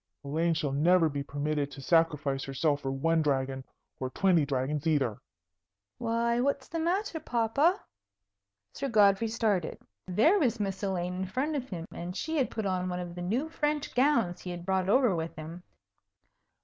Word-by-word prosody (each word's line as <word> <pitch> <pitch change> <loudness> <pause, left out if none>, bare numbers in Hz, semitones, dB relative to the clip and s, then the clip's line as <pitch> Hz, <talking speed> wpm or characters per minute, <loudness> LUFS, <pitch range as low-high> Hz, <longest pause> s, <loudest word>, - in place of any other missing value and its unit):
Elaine 160 +4 0
shall 150 -3 -1
never 165 +4 +4
be 140 -1 -3
permitted 145 0 -2
to 145 - -11
sacrifice 150 -3 +1
herself 145 +2 0
for 135 - -3
one 160 +5 +1
dragon, 135 -2 -1 0.4
or 130 - -2
twenty 170 -1 +2
dragons, 140 +3 -1
either." 135 -9 +1 0.8
"Why, 235 +1 +1
what's 280 0 0
the 330 - -4
matter, 350 +1 -1
papa?" 275 +6 +1 0.9
Sir 275 - -3
Godfrey 210 -1 +4
started. 215 -6 0 0.3
There 295 - +4
was 240 - +1
Miss 195 -2 -2
Elaine 180 -3 -1
in 185 +1 -3
front 275 +10 -1
of 265 -2 -3
him; 170 -4 -5
and 175 +1 -6
she 320 0 -2
had 270 - +1
put 220 - -4
on 185 -1 -1
one 180 0 -3
of 175 -1 -6
the 175 - -7
new 230 - -1
French 300 -2 -2
gowns 245 -9 +2
he 180 - -7
had 175 -1 -6
brought 190 0 0
over 245 -3 +4
with 165 0 -4
him. 160 +3 -8
180 Hz, 175 wpm, -29 LUFS, 155-235 Hz, 0.9 s, never